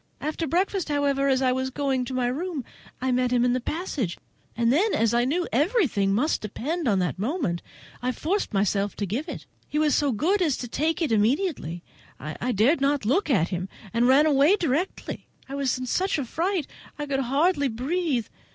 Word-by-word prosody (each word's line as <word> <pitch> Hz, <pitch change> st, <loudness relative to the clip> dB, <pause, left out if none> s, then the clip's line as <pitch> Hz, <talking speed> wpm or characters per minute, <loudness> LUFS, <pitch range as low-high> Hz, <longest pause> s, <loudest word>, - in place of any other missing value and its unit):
After 315 Hz, +2 st, -2 dB
breakfast 370 Hz, +3 st, 0 dB
however, 280 Hz, -1 st, +1 dB
as 265 Hz, -1 st, +2 dB
I 255 Hz, -, +3 dB
was 260 Hz, +1 st, -1 dB
going 265 Hz, -2 st, -1 dB
to 260 Hz, -, -6 dB
my 255 Hz, -1 st, +1 dB
room, 290 Hz, +2 st, -2 dB, 0.3 s
I 260 Hz, +1 st, 0 dB
met 250 Hz, 0 st, +2 dB
him 245 Hz, 0 st, +2 dB
in 245 Hz, -, +3 dB
the 255 Hz, -, 0 dB
passage, 280 Hz, -, -3 dB, 0.4 s
and 235 Hz, +1 st, +3 dB
then, 400 Hz, +9 st, +2 dB
as 230 Hz, 0 st, +2 dB
I 240 Hz, +1 st, +3 dB
knew 330 Hz, +7 st, +1 dB
that -, -, -9 dB
everything 285 Hz, -, +2 dB
must 250 Hz, +11 st, +1 dB
depend 290 Hz, -, -3 dB
on 205 Hz, -4 st, +3 dB
that 180 Hz, -2 st, -1 dB
moment, 225 Hz, -, -1 dB, 0.4 s
I 250 Hz, +1 st, 0 dB
forced 360 Hz, -, -1 dB
myself 200 Hz, 0 st, 0 dB
to 205 Hz, -, -2 dB
give 245 Hz, -, -3 dB
it. -, -, -7 dB, 0.2 s
He 300 Hz, -, -3 dB
was 305 Hz, -2 st, +3 dB
so 290 Hz, -2 st, +2 dB
good 355 Hz, -, +1 dB
as 310 Hz, -7 st, +2 dB
to 245 Hz, -, -5 dB
take 320 Hz, +8 st, 0 dB
it 305 Hz, -, 0 dB
immediately. 220 Hz, -, 0 dB, 0.4 s
I 155 Hz, +11 st, -3 dB
dared 250 Hz, -, +3 dB
not 280 Hz, -3 st, +1 dB
look 320 Hz, -, +2 dB
at 190 Hz, -, +2 dB
him, 180 Hz, 0 st, -3 dB, 0.2 s
and 235 Hz, +1 st, +3 dB
ran 275 Hz, +4 st, +6 dB
away 295 Hz, +5 st, +5 dB
directly. 340 Hz, 0 st, -2 dB, 0.2 s
I 270 Hz, -, -8 dB
was 275 Hz, -2 st, 0 dB
in 255 Hz, -, -4 dB
such 370 Hz, +10 st, 0 dB
a 280 Hz, -, -2 dB
fright 340 Hz, -, -1 dB, 0.3 s
I 295 Hz, -, -3 dB
could 275 Hz, -2 st, -1 dB
hardly 285 Hz, +4 st, +2 dB
breathe. 265 Hz, +1 st, -1 dB
270 Hz, 205 wpm, -25 LUFS, 235-315 Hz, 0.4 s, ran